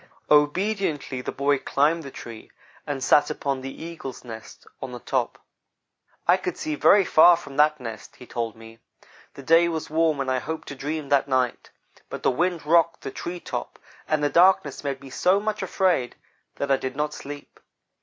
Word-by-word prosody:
Obediently 150 Hz, -2 st, +1 dB
the -, -, -4 dB
boy 140 Hz, 0 st, +1 dB
climbed 155 Hz, +6 st, +1 dB
the 140 Hz, -, -8 dB
tree 115 Hz, -4 st, -10 dB, 0.4 s
and 135 Hz, -3 st, -3 dB
sat 145 Hz, 0 st, +4 dB
upon 140 Hz, -3 st, -2 dB
the 135 Hz, +4 st, -8 dB
eagle's 165 Hz, -6 st, -8 dB
nest 110 Hz, -3 st, -10 dB, 0.2 s
on 130 Hz, -, -5 dB
the 125 Hz, -, -6 dB
top. -, -, -2 dB, 0.9 s
"I -, -, +6 dB
could -, -, -4 dB
see 155 Hz, -, -3 dB
very 195 Hz, +6 st, +5 dB
far 170 Hz, +1 st, +7 dB
from 145 Hz, -5 st, -11 dB
that 150 Hz, 0 st, +4 dB
nest," 115 Hz, -4 st, -8 dB
he 125 Hz, -, -13 dB
told 115 Hz, -2 st, -4 dB
me. 115 Hz, 0 st, -14 dB, 0.6 s
"The 140 Hz, -, -10 dB
day 165 Hz, +4 st, +5 dB
was 160 Hz, -2 st, -4 dB
warm 160 Hz, -2 st, +2 dB
and 135 Hz, -1 st, -1 dB
I 130 Hz, -, +1 dB
hoped 160 Hz, +4 st, -6 dB
to 140 Hz, -, -6 dB
dream 145 Hz, +1 st, -4 dB
that 140 Hz, -1 st, +3 dB
night, 130 Hz, -3 st, -1 dB, 0.4 s
but -, -, -7 dB
the -, -, +3 dB
wind 170 Hz, +4 st, -1 dB
rocked 165 Hz, +1 st, +3 dB
the -, -, -6 dB
tree 175 Hz, +1 st, -6 dB
top, -, -, -6 dB, 0.3 s
and 155 Hz, -1 st, 0 dB
the 145 Hz, -, +3 dB
darkness 175 Hz, -6 st, +3 dB
made 135 Hz, -2 st, -3 dB
me 135 Hz, -1 st, -11 dB
so 185 Hz, +7 st, +2 dB
much 215 Hz, +1 st, -3 dB
afraid 180 Hz, -10 st, 0 dB, 0.4 s
that 140 Hz, 0 st, -2 dB
I 135 Hz, -, +4 dB
did 130 Hz, 0 st, -5 dB
not 150 Hz, +1 st, -2 dB
sleep. 145 Hz, 0 st, -10 dB
145 Hz, 190 wpm, -24 LUFS, 130-165 Hz, 0.9 s, far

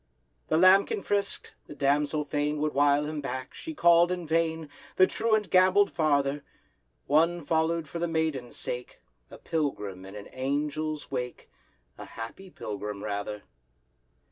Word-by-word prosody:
The 155 Hz, -, +2 dB
lambkin 195 Hz, -, +5 dB
frisk'd, 200 Hz, -1 st, -1 dB, 0.2 s
the -, -, -9 dB
damsel 145 Hz, +2 st, +1 dB
fain 145 Hz, +1 st, -1 dB
Would 150 Hz, 0 st, 0 dB
wile 145 Hz, +1 st, +3 dB
him 150 Hz, 0 st, -4 dB
back,—she 135 Hz, -, -6 dB
called 170 Hz, -2 st, +5 dB
in 180 Hz, -2 st, -3 dB
vain. 160 Hz, 0 st, 0 dB, 0.3 s
The 185 Hz, -, +7 dB
truant 215 Hz, -1 st, 0 dB
gamboll'd 185 Hz, +2 st, +5 dB
farther: 145 Hz, -3 st, +1 dB, 0.6 s
One 165 Hz, +2 st, +2 dB
follow'd 160 Hz, 0 st, +1 dB
for 155 Hz, +5 st, -6 dB
the 170 Hz, -, 0 dB
maiden's 160 Hz, -7 st, -2 dB
sake, 125 Hz, 0 st, -5 dB, 0.3 s
A -, -, -11 dB
pilgrim 105 Hz, -, -3 dB
in 95 Hz, -, -10 dB
an 100 Hz, -1 st, -8 dB
Angel's 150 Hz, +3 st, -3 dB
wake— 125 Hz, -2 st, -5 dB, 0.5 s
A -, -, -7 dB
happy 115 Hz, +12 st, -9 dB
pilgrim, 105 Hz, -, -6 dB
rather. 105 Hz, 0 st, -4 dB
150 Hz, 140 wpm, -28 LUFS, 135-170 Hz, 0.6 s, The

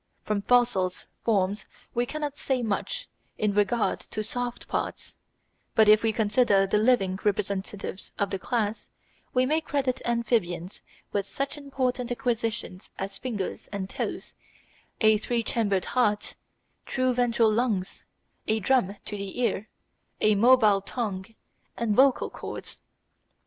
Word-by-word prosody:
From 210 Hz, -1 st, -1 dB
fossil 240 Hz, -5 st, +3 dB, 0.3 s
forms 205 Hz, -2 st, +1 dB, 0.3 s
we 240 Hz, +1 st, 0 dB
cannot 295 Hz, 0 st, -3 dB
say 260 Hz, -4 st, -1 dB
much -, -, -2 dB, 0.3 s
in 210 Hz, -1 st, +1 dB
regard 210 Hz, +3 st, +1 dB
to 215 Hz, -, -5 dB
soft 245 Hz, +2 st, -4 dB
parts; -, -, -3 dB, 0.6 s
but 220 Hz, -1 st, +6 dB
if 215 Hz, 0 st, +7 dB
we 225 Hz, -, +2 dB
consider 210 Hz, -2 st, +3 dB
the 200 Hz, +2 st, +2 dB
living 210 Hz, -5 st, +3 dB
representatives 200 Hz, -1 st, -2 dB
of 200 Hz, -1 st, 0 dB
the 195 Hz, -, -2 dB
class, 220 Hz, 0 st, -2 dB, 0.4 s
we 255 Hz, 0 st, +3 dB
may 310 Hz, +4 st, +2 dB
credit 270 Hz, -4 st, -1 dB
amphibians 215 Hz, -7 st, -1 dB, 0.3 s
with 200 Hz, -1 st, -1 dB
such 275 Hz, 0 st, -2 dB
important 265 Hz, -4 st, -2 dB
acquisitions 230 Hz, -6 st, -2 dB
as 195 Hz, +1 st, -5 dB
fingers 215 Hz, -7 st, -4 dB
and 195 Hz, -2 st, -4 dB
toes, -, -, -4 dB, 0.7 s
a 215 Hz, -1 st, +5 dB
three 235 Hz, +1 st, -1 dB
chambered 205 Hz, -5 st, 0 dB
heart, 210 Hz, -5 st, +1 dB, 0.5 s
true 255 Hz, -1 st, +1 dB
ventral 235 Hz, -2 st, +3 dB
lungs, 215 Hz, -5 st, -1 dB, 0.4 s
a 220 Hz, 0 st, +2 dB
drum 210 Hz, -3 st, +2 dB
to 210 Hz, -, -4 dB
the 200 Hz, +2 st, -5 dB
ear, 220 Hz, -3 st, 0 dB, 0.5 s
a 215 Hz, -, +4 dB
mobile 215 Hz, -2 st, +5 dB
tongue, 195 Hz, -3 st, -3 dB, 0.5 s
and 220 Hz, -3 st, 0 dB
vocal 265 Hz, +1 st, +4 dB
cords. -, -, -8 dB
220 Hz, 135 wpm, -27 LUFS, 200-245 Hz, 0.7 s, if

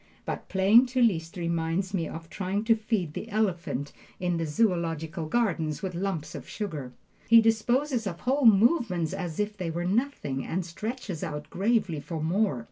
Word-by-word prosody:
But -, -, -5 dB
playing 205 Hz, +6 st, +5 dB
to 255 Hz, 0 st, 0 dB
Liszt 170 Hz, -5 st, +1 dB
reminds 170 Hz, +2 st, -1 dB
me 170 Hz, -4 st, 0 dB
of 165 Hz, 0 st, -8 dB
trying 195 Hz, +4 st, -2 dB
to 225 Hz, 0 st, +4 dB
feed 215 Hz, -8 st, -2 dB
the 225 Hz, -, -6 dB
elephant 175 Hz, -, -1 dB, 0.3 s
in 180 Hz, -1 st, 0 dB
the 165 Hz, -1 st, -1 dB
Zoological 165 Hz, -3 st, 0 dB
Garden 190 Hz, -6 st, +1 dB, 0.2 s
with 185 Hz, -1 st, -2 dB
lumps 170 Hz, -4 st, -3 dB
of -, -, -8 dB
sugar. 150 Hz, -, -5 dB, 0.3 s
He 230 Hz, 0 st, +8 dB
disposes 235 Hz, +2 st, +1 dB
of 170 Hz, -3 st, -5 dB
whole 265 Hz, 0 st, +3 dB
movements 205 Hz, -, +4 dB
as 180 Hz, -4 st, -4 dB
if 210 Hz, 0 st, -1 dB
they 180 Hz, -5 st, -3 dB
were 170 Hz, +2 st, -2 dB
nothing, 190 Hz, -, -1 dB
and 180 Hz, +1 st, -2 dB
stretches 210 Hz, -, -5 dB
out 150 Hz, -2 st, -5 dB
gravely 200 Hz, -5 st, +1 dB
for 160 Hz, +2 st, -5 dB
more! 165 Hz, -, +1 dB
190 Hz, 170 wpm, -28 LUFS, 165-220 Hz, 0.3 s, He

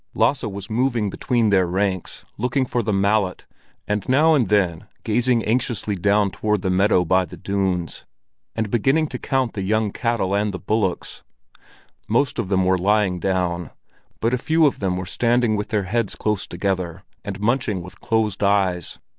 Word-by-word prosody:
Lasse 120 Hz, +5 st, +2 dB
was 100 Hz, -2 st, -6 dB
moving 115 Hz, -3 st, 0 dB
between 115 Hz, -1 st, +1 dB
their 95 Hz, -2 st, +3 dB
ranks, 95 Hz, 0 st, -2 dB
looking 125 Hz, +4 st, 0 dB
for 120 Hz, -1 st, -1 dB
the 110 Hz, -1 st, -1 dB
mallet, 100 Hz, -1 st, +1 dB, 0.4 s
and 105 Hz, +1 st, -2 dB
now 155 Hz, +5 st, +5 dB
and 125 Hz, -10 st, +2 dB
then 95 Hz, -6 st, +1 dB, 0.2 s
gazing 120 Hz, -1 st, +1 dB
anxiously 115 Hz, -3 st, -1 dB
down 100 Hz, +2 st, +2 dB
towards 105 Hz, -1 st, -1 dB
the 95 Hz, -, +1 dB
meadow 95 Hz, -1 st, +3 dB
by 95 Hz, +3 st, +3 dB
the 85 Hz, -, -10 dB
dunes, 95 Hz, -4 st, -2 dB, 0.5 s
and 110 Hz, -2 st, -2 dB
beginning 135 Hz, +7 st, +2 dB
to -, -, -5 dB
count 130 Hz, -4 st, -1 dB
the 100 Hz, -, -4 dB
young 105 Hz, +2 st, 0 dB
cattle 115 Hz, -5 st, -1 dB
and 100 Hz, -1 st, 0 dB
the -, -, -6 dB
bullocks. 105 Hz, -5 st, -2 dB, 0.9 s
Most 125 Hz, +5 st, +1 dB
of 95 Hz, -, -2 dB
them 95 Hz, -2 st, +2 dB
were 95 Hz, 0 st, +2 dB
lying 100 Hz, -1 st, +2 dB
down, 90 Hz, -3 st, -1 dB, 0.5 s
but 115 Hz, +2 st, +1 dB
a 125 Hz, -, +1 dB
few 160 Hz, +3 st, +3 dB
of 140 Hz, -, +1 dB
them 95 Hz, -2 st, -1 dB
were 90 Hz, -, -4 dB
standing 120 Hz, +3 st, +1 dB
with 105 Hz, 0 st, -3 dB
their 105 Hz, -4 st, 0 dB
heads 105 Hz, +2 st, -1 dB
close 105 Hz, -2 st, -1 dB
together, 90 Hz, -1 st, -3 dB, 0.2 s
and 100 Hz, 0 st, -5 dB
munching 105 Hz, -4 st, 0 dB
with 90 Hz, -, -13 dB
closed 110 Hz, -3 st, 0 dB
eyes. 100 Hz, -3 st, +1 dB
105 Hz, 175 wpm, -22 LUFS, 95-115 Hz, 0.9 s, now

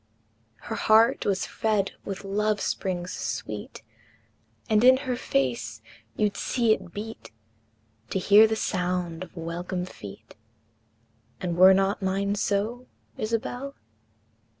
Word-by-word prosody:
Her 225 Hz, -, -5 dB
heart 225 Hz, +4 st, +4 dB
was 195 Hz, -2 st, +1 dB
fed 210 Hz, -3 st, 0 dB
with 195 Hz, 0 st, -6 dB
love 210 Hz, +1 st, 0 dB
springs 180 Hz, -2 st, -2 dB
sweet, 105 Hz, 0 st, -5 dB, 0.8 s
And 215 Hz, +1 st, +3 dB
in 260 Hz, +1 st, +8 dB
her 255 Hz, -1 st, 0 dB
face 125 Hz, -, -1 dB, 0.3 s
you'd 210 Hz, -1 st, +1 dB
see 235 Hz, -3 st, +2 dB
it 185 Hz, -4 st, -6 dB
beat 220 Hz, +4 st, -7 dB, 0.8 s
To -, -, -1 dB
hear 205 Hz, +3 st, +7 dB
the 220 Hz, -, -1 dB
sound 180 Hz, -4 st, -2 dB
of 185 Hz, -1 st, -9 dB
welcome 175 Hz, +2 st, -4 dB
feet 100 Hz, -, -11 dB, 1.1 s
And 175 Hz, -2 st, -2 dB
were 185 Hz, +2 st, +8 dB
not 195 Hz, +2 st, +1 dB
mine 195 Hz, +1 st, 0 dB
so, 210 Hz, +5 st, -1 dB, 0.3 s
Isabel? 245 Hz, +5 st, -3 dB
200 Hz, 120 wpm, -26 LUFS, 180-220 Hz, 1.1 s, in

